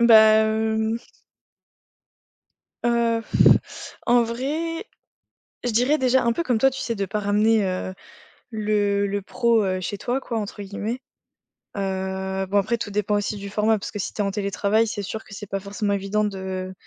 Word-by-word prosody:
Ben 235 - +5
hem 220 0 +5 1.9
heu, 235 -1 +2 0.4
f - - -11
en 240 0 +5
vrai, 305 - -3 0.8
je 245 - +1
dirais 250 +7 +3
déjà 260 -1 +3
un 235 - +3
peu 335 - -1
comme 245 -6 +1
toi, 270 +5 +5
tu 270 0 -7
sais, 230 - -2
de 200 -1 -1
pas 210 - -2
«ramener, 210 +1 +3
heu, 185 0 -3 0.6
le 205 -2 +1
le 200 0 -2
pro, 230 +1 +2
heu, 185 -1 -1
chez 200 +3 -4
toi» 245 +6 -1
quoi, 230 -4 -3
entre 205 0 -5
guillemets, 210 +5 -4 0.8
heu, 190 0 -2
bon 200 +2 +1
après 220 +4 +2
tout - - -4
dépend 210 0 0
aussi 205 +1 -1
du 200 0 -7
format, 215 +2 +2
parce 200 - -6
que 205 - -5
si - - -3
tu - - -2
es 205 - +1
en 200 - -1
télétravail, 205 +2 +1
c'est 205 -1 -4
sûr 220 +3 -5
que 200 - -11
c'est 210 - -7
pas 195 - -2
forcément 200 +1 -2
évident 200 +2 0
de 190 -2 -4
210 Hz, 180 wpm, -24 LUFS, 200-230 Hz, 1.9 s, Ben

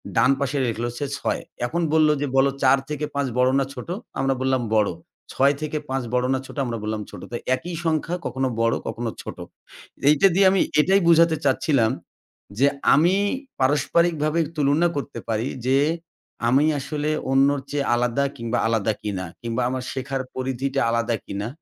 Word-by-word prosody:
ডান - - +5
পাশে 140 0 -1
লিখলো 115 +1 -2
সে 145 - -2
৬, - - -2 0.2
এখন 170 +8 -2
বলল 155 -1 +5
যে, - - +1
"বল, 135 0 +5 0.2
৪ 135 +1 +6
থেকে 150 0 -2
৫ 140 -1 0
বড় 125 0 +4
না 135 - +1
ছোট?" 125 +1 -8 0.3
আমরা 135 0 +2
বললাম, 130 -1 +1
"বড়।" 105 -2 +4 0.5
"ছয় 140 +2 +4
থেকে 155 0 -2
৫ 135 0 -1
বড় 125 0 +2
না 130 - 0
ছোট?" - - -12
আমরা 120 -2 -3
বললাম, 110 0 -2
"ছোট।" - - -10
তো - - -4 0.2
একই 175 +6 -7
সংখ্যা 160 +2 0
কখনো 130 0 -1
বড়, 115 0 +2
কখনো 115 0 -3
ছোট। - - -8 0.7
এইটা 150 +6 +6
দিয়ে 195 +1 +5
আমি 195 - +3 0.2
এটাই 195 +5 +3
বুঝাতে 165 -1 +5
চাচ্ছিলাম, 135 -4 +2 0.7
যে 140 - +5 0.3
আমি 170 +6 +4 0.4
পারস্পারিকভাবে 155 +3 +2 0.2
তুলনা 145 +4 +3
করতে 140 0 -4
পারি 110 +2 0 0.2
যে 130 +1 +3 0.7
আমি 135 +5 +4
আসলে 150 +2 -3 0.2
অন্যর 140 +1 +4
চেয়ে 140 -1 -1
আলাদা 120 +3 +1
কিংবা 115 -2 -2
আলাদা 110 -1 +1
কিনা, 100 -3 -3 0.2
কিংবা 115 +1 -2
আমার 130 0 -3
শেখার 135 0 -3
পরিধিটা 135 +1 -2
আলাদা 115 0 0
কিনা, 100 +2 -4
135 Hz, 170 wpm, -23 LUFS, 120-150 Hz, 0.7 s, ৪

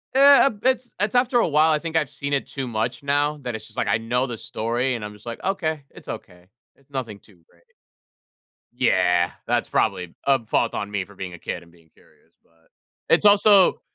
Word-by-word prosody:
Eh, 280 +1 +7
um, 215 -7 -1
it's 255 -1 0
it's 205 +2 0
after 245 0 +3
a - - +3
while, 155 +1 +3
I 155 - +3
think 165 +1 -6
I've 150 -4 +1
seen 140 0 -5
it 140 - -1
too 135 -2 -5
much 120 +4 -3
now 145 +1 +1
that 120 -2 -4
it's 110 0 -8
just - - -14
like, 110 - 0
know 125 +3 0
the 120 -4 -6
story 120 +5 -2
and 105 - -5
I'm 105 - -8
just 105 - -17
like, 115 -1 -7
"Okay, 160 -6 -2
it's - - -15
okay. 90 0 -9 0.3
It's 140 0 -30
nothing 125 -7 -5
too 95 -6 -23
great." 85 - -28 1.1
Yeah. 90 -1 +2 0.2
That's - - 0
probably 90 -2 -1
a 135 -4 +2
fault 115 +1 0
on 100 - -4
me 100 -2 -3
for 100 +1 -17
being 95 -2 -7
a 85 - -11
kid - - -5
and 85 - -20
being 85 -2 -24
curious. - - -28
But, 80 0 -33 0.4
it's 170 +5 +4
also 205 -1 +6
130 Hz, 215 wpm, -23 LUFS, 105-160 Hz, 1.1 s, Eh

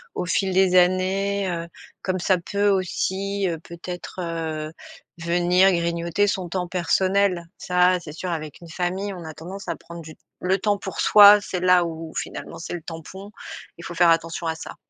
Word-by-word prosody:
au - - -2
fil 190 +1 0
des 185 -1 +4
années, 190 +2 +2
heu, 170 -1 -4 0.3
comme 185 -1 -2
ça 185 +1 +2
peut 200 +4 0
aussi, 195 +1 -1
heu, 165 - -3
peut-être, 175 +2 -8
heu, 160 -2 -4 0.5
venir 175 +3 +3
grignoter 170 +3 0
son 195 -3 -2
temps 180 +1 -3
personnel. 185 +1 +1
Ça, 180 -1 +3
c'est 150 -3 -10
sûr 180 +3 -5
avec 155 -2 -6
une 170 - -12
famille, 185 +4 -2
on 175 -3 -9
a 160 - -7
tendance 185 +5 -9
à 170 - -2
prendre 170 +1 -11
du 155 -1 -11 0.3
le 185 +1 +1
temps 205 +1 0
pour 195 -1 -5
soi, 205 0 +8
c'est 190 -2 -4
là 180 0 +4
où 165 -1 -6
finalement - - -6
c'est 165 - -7
le 175 - -5
tampon. 180 +5 -9 0.5
Il 170 - -11
faut 175 - -6
faire 175 +1 +4
attention 165 0 0
à 160 - -1
ça. - - -9
180 Hz, 185 wpm, -23 LUFS, 170-190 Hz, 0.5 s, soi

